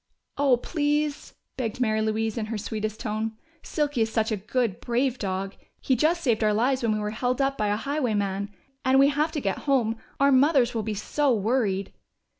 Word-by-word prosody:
"Oh, 275 -3 +3
please!" 295 +1 -1 0.2
begged 235 -3 -3
Mary 220 -3 +1
Louise 220 0 -1
in 220 -3 -3
her 225 0 -3
sweetest 215 +1 -4
tone. 220 0 -2 0.3
"Silky 290 -5 -1
is 220 0 +1
such 220 0 0
a - - +2
good, 215 0 -1
brave 250 +1 0
dog! 195 0 -3 0.3
He 260 - +1
just 330 +7 +1
saved 230 -4 +2
our 210 -1 +3
lives 255 +4 +2
when 230 -2 +1
we 215 - -1
were 210 0 -2
held 245 +3 -1
up 275 0 +1
by 210 - -1
a 205 - +1
highwayman. 210 -6 -1 0.3
And 260 +1 +4
we 275 +1 +6
have 300 +2 0
to 300 - -1
get 195 -7 -2
home 235 -5 +2 0.2
our 280 0 +5
mothers 265 -2 +4
will 225 - -1
be 215 0 -3
so 280 +7 0
worried." 205 -3 0
230 Hz, 200 wpm, -26 LUFS, 215-275 Hz, 0.3 s, we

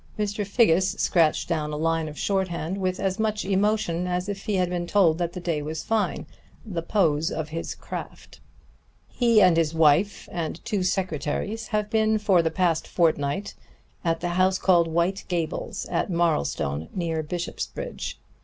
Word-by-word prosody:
Mr. 210 0 -1
Figgis 195 -3 +3
scratched 165 -4 +2
down 155 -3 -1
a 150 - -3
line 165 0 0
of 150 - -10
shorthand 190 -2 -1
with 185 -1 -1
as 195 0 -1
much 215 -2 0
emotion 195 -3 +1
as 180 +1 -1
if 200 -1 -5
he 210 -2 0
had 180 -1 +2
been 175 -1 -3
told 170 -4 +3
that 175 -1 -1
the - - -5
day 170 -4 -1
was 155 +2 -4
fine 220 -2 -1 0.4
the 180 -6 -3
pose 165 -4 +1
of 155 -1 -4
his 165 +2 -4
craft. - - -8 0.7
"He 235 -4 +4
and 180 -2 +6
his 165 -1 +1
wife 160 +6 +3
and 165 -1 -3
two 205 -3 -1
secretaries 180 +3 -2
have 210 -1 -1
been 220 -1 +3
for 200 -4 +3
the 165 - +1
past 165 -1 0
fortnight 165 +2 0 0.5
at 165 -2 0
the 175 - -1
house 185 +2 +2
called 175 -4 +4
White 170 +4 0
Gables, 170 -3 -3
at - - -1
Marlstone, 80 - 0
near 165 -3 -1
Bishopsbridge. 175 - -5
180 Hz, 165 wpm, -25 LUFS, 165-200 Hz, 0.7 s, and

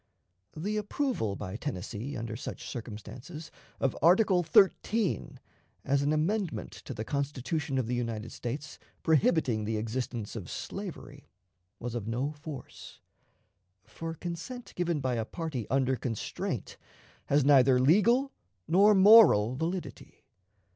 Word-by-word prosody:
The 205 +7 -2
approval 210 - -1
by 95 0 -6
Tennessee, 125 +1 -5
under 115 -1 -4
such 120 - -7
circumstances, 120 - -8 0.3
of 135 - 0
Article 180 +2 +5
XIII, 200 +4 +2 0.5
as 140 +1 +2
an 145 +1 +1
amendment 160 - -1
to - - -6
the 110 - -4
Constitution 140 +1 -2
of 130 - +1
the 120 - -3
United 115 -2 -3
States 135 +5 -6 0.2
prohibiting 150 -7 +2
the 110 +1 -1
existence 115 0 -4
of 100 -7 -6
slavery, - - -7 0.5
was 120 0 -5
of 115 -3 -4
no 125 +6 -1
force; 145 -3 -10 0.9
for 165 0 -6
consent 180 - -7
given 170 -4 0
by 130 -1 0
a 115 - 0
party 145 - -5
under 130 -1 +2
constraint 115 -2 -4 0.5
has 145 -1 +3
neither 135 -3 +6
legal 215 - +4 0.4
nor 200 +5 +5
moral 190 - +7
validity. 170 +5 -5
140 Hz, 125 wpm, -29 LUFS, 120-170 Hz, 0.9 s, moral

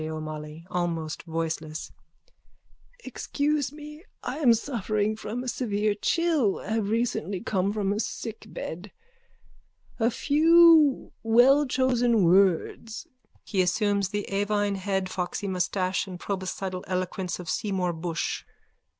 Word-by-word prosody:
O'MOLLOY: 155 0 -6
(Almost 165 -3 -2
voicelessly.) 160 -1 -4 1.1
Excuse 290 -2 -1
me. 300 +1 -11 0.2
I - - -4
am 245 -7 +5
suffering 215 -3 -1
from 220 +3 -5
a - - -6
severe 215 -4 0
chill, 300 - +1
have 215 -1 -2
recently 220 -5 -1
come 195 +1 0
from 205 -2 0
a 210 - -2
sickbed. 210 -5 -6 1.1
A 225 +1 +3
few 315 +2 +5
wellchosen 245 -1 +4
words. 190 +4 +2 0.4
_(He 195 -4 +1
assumes 200 +1 +1
the 205 0 -3
avine 205 0 0
head, 190 -1 -1
foxy 185 +2 -3
moustache 185 +1 -1
and 180 -2 -8
proboscidal 190 -1 -4
eloquence 185 -1 -2
of 180 - -9
Seymour 185 -2 -1
Bushe.) 165 0 -3
205 Hz, 110 wpm, -27 LUFS, 180-235 Hz, 1.1 s, am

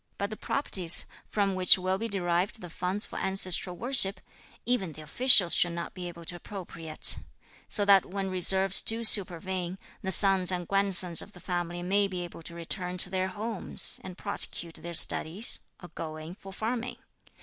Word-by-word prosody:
But 200 +1 -4
the - - -5
properties, 185 - +1 0.2
from 200 -2 -1
which 185 0 +5
will 185 +1 -2
be 230 - -3
derived 185 0 -1
the 175 -5 -10
funds 190 +5 -4
for - - -8
ancestral 185 -2 0
worship, 220 -6 +2 0.5
even 215 -9 -1
the 155 - -12
officials 195 - +5
should 175 -1 +2
not 170 0 -6
be 180 -1 -7
able 170 -1 -11
to 175 - -6
appropriate, 170 -5 0 0.5
so 205 - +3
that 195 -2 +4
when 195 0 -5
reverses 190 +1 +5
do 225 +1 +4
supervene, 185 -3 +3 0.2
the 190 - -3
sons 190 -1 +3
and 175 -2 -4
grandsons 190 -3 +2
of 205 - -13
the 180 - -13
family 175 -1 -4
may 200 +2 +1
be 185 -2 -6
able 175 -1 -10
to 170 +1 -9
return 180 +2 -5
to 180 +1 0
their 185 0 -1
homes, 210 +1 -2
and 185 -1 -10
prosecute 175 -4 -1
their 170 0 -7
studies, 175 +8 0 0.2
or 175 - -10
go 160 -1 -7
in 155 +2 -9
for 195 +1 -13
farming. 235 +4 -4
185 Hz, 180 wpm, -27 LUFS, 175-200 Hz, 0.5 s, which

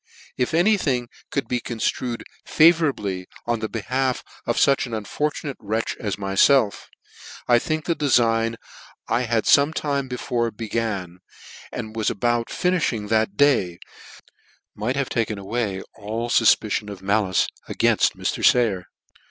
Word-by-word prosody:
If 125 +5 -1
any 205 +6 +4
thing 125 -9 -1 0.2
could 140 - -2
be 125 - -1
conftrued 120 +1 -3 0.2
favour 160 0 +5
ably 95 -8 -4 0.2
on 120 -1 0
the 110 0 -3
behalf 130 +4 -1 0.2
of - - 0
fuch 140 -2 +3
an 115 - -4
unfortunate 140 +6 -3
wretch 110 +2 -2
as 100 -4 -2
myfelf, 100 +4 +2 0.6
I 120 -1 +5
think 155 +4 -3
the 170 - 0
defign 115 -6 +2 0.5
I 115 - +1
had 115 -1 +1
fometime 140 -2 +2
be 125 - -4
fore 120 -1 -1
began, 105 -5 -4 0.5
and 110 0 -6
was 110 -2 0
about 120 +2 0
finifhing 155 - -1
that 110 -2 +1
day, 120 -12 +3 1.0
might 115 +5 -2
have 140 -1 -1
taken 110 -3 -1
away 100 -1 -3
all 110 +3 -4
fufpiciqn 110 -2 +3
of 95 -2 -9
malice 100 -2 +2 0.2
againft - - +2
Mr. - - -3
Sayer. 105 -7 +3
115 Hz, 140 wpm, -23 LUFS, 105-135 Hz, 1.0 s, favour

